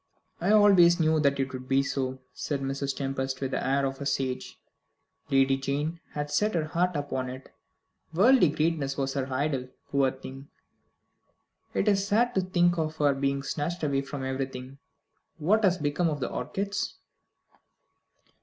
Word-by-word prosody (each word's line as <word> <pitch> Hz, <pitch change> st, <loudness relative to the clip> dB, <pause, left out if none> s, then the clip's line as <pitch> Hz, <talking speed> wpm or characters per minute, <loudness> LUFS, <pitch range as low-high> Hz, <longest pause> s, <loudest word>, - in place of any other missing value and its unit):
"I 175 Hz, -, 0 dB
always 190 Hz, -5 st, +6 dB
knew 160 Hz, -1 st, +3 dB
that 140 Hz, -2 st, +2 dB
it 135 Hz, -1 st, -1 dB
would 130 Hz, 0 st, -7 dB
be 135 Hz, 0 st, +3 dB
so," 130 Hz, -2 st, -2 dB, 0.2 s
said 140 Hz, -2 st, -3 dB
Mrs. 135 Hz, 0 st, -2 dB
Tempest, 135 Hz, -1 st, -3 dB
with 135 Hz, -1 st, -3 dB
the -, -, -1 dB
air 135 Hz, +1 st, +1 dB
of 135 Hz, +1 st, -4 dB
a 140 Hz, -, -2 dB
sage. 130 Hz, -2 st, -2 dB, 0.7 s
"Lady 135 Hz, 0 st, +3 dB
Jane 145 Hz, +5 st, -2 dB
had 145 Hz, 0 st, -3 dB
set 210 Hz, +6 st, +1 dB
her 160 Hz, -2 st, +1 dB
heart 175 Hz, +3 st, 0 dB
upon 140 Hz, -3 st, -2 dB
it. 130 Hz, +1 st, -9 dB, 0.6 s
Worldly 200 Hz, -, +5 dB
greatness 150 Hz, -3 st, -1 dB
was 135 Hz, -1 st, -1 dB
her 135 Hz, -1 st, -3 dB
idol, 130 Hz, -1 st, -1 dB, 0.2 s
poor 140 Hz, -1 st, +3 dB
thing! 135 Hz, +1 st, -10 dB, 1.3 s
It 200 Hz, -, +1 dB
is 200 Hz, -1 st, +2 dB
sad 235 Hz, +4 st, +2 dB
to 190 Hz, -, +2 dB
think 175 Hz, -2 st, +2 dB
of 155 Hz, 0 st, -1 dB
her 145 Hz, -2 st, +3 dB
being 140 Hz, 0 st, -1 dB
snatched 160 Hz, +4 st, -3 dB
away 140 Hz, -2 st, +1 dB
from 140 Hz, 0 st, -6 dB
everything. 130 Hz, 0 st, -5 dB, 0.6 s
What 200 Hz, +8 st, +2 dB
has 185 Hz, -2 st, +4 dB
become 155 Hz, +2 st, 0 dB
of 150 Hz, -2 st, -3 dB
the -, -, -3 dB
orchids?" 200 Hz, +10 st, -3 dB
140 Hz, 165 wpm, -28 LUFS, 135-170 Hz, 1.3 s, always